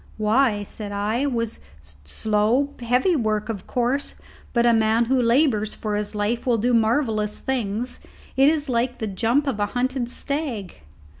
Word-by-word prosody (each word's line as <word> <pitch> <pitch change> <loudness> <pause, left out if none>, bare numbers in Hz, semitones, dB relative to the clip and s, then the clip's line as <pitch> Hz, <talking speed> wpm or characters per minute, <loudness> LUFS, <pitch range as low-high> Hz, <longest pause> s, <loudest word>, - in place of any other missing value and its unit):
"Why," 215 0 +2
said 205 0 -7
I, 210 +6 -1
"'twas 230 -5 -2 0.2
slow, 210 - -1
heavy 250 +9 +2
work, 215 -4 -1
of 205 -4 -5
course; 250 +3 -1 0.4
but 235 -1 +2
a 235 - +5
man 225 +1 +3
who 260 +2 +2
labours 235 -3 +2
for 210 -1 -3
his 210 +1 -3
life 220 +4 -1
will 240 -2 +3
do 245 +3 +1
marvellous 220 -2 +1
things. 240 -2 -3 0.4
It 270 +2 +6
is 305 -2 0
like 245 0 0
the 220 - -3
jump 225 +8 +1
of 260 -7 -2
a 205 - +1
hunted 255 -1 -1
stag." 260 - -3
230 Hz, 160 wpm, -23 LUFS, 210-255 Hz, 0.4 s, It